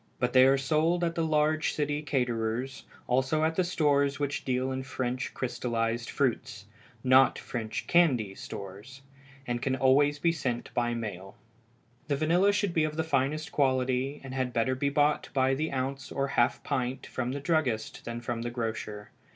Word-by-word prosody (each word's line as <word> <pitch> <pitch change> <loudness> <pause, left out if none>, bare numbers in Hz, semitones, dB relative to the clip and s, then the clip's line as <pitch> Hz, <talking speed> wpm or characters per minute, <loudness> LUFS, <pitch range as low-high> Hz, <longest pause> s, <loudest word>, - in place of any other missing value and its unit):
But 125 0 -1
they 130 0 +7
are 135 +1 +4
sold 160 +5 +1
at 165 -1 0
the 165 - -1
large 155 0 +1
city 145 0 -1
caterers', 125 -2 -2 0.2
also 130 +5 +1
at 160 +1 +1
the 185 - +2
stores 145 -5 +1
which 145 -1 -2
deal 130 0 -1
in 130 0 -2
French 125 -1 -3
crystallized 120 -2 -2
fruits 115 -6 -1 0.4
not 130 0 +5
French 110 -3 -4
candy 130 - +3
stores 100 +9 -9 0.4
and 120 -1 -2
can 130 0 0
always 140 +3 +3
be 165 +3 +2
sent 130 -7 -3
by 120 0 0
mail. 95 -4 -6 0.7
The 145 - +1
vanilla 170 +7 +3
should 205 -3 0
be 160 - +2
of 155 0 -2
the 160 - +1
finest 150 0 -1
quality, 130 0 +1
and 130 -1 -7
had 130 -2 -2
better 115 +2 +1
be 140 +2 0
bought 145 +1 +1
by 130 0 +3
the 155 +4 -1
ounce 135 0 -3
or 140 0 -1
half 120 -3 +1
pint 130 -2 -2
from 130 0 -3
the 140 - -3
druggist 140 -7 -1
than 120 0 -5
from 120 0 -3
the 120 - -3
grocer. 110 -3 -5
130 Hz, 175 wpm, -29 LUFS, 120-150 Hz, 0.7 s, they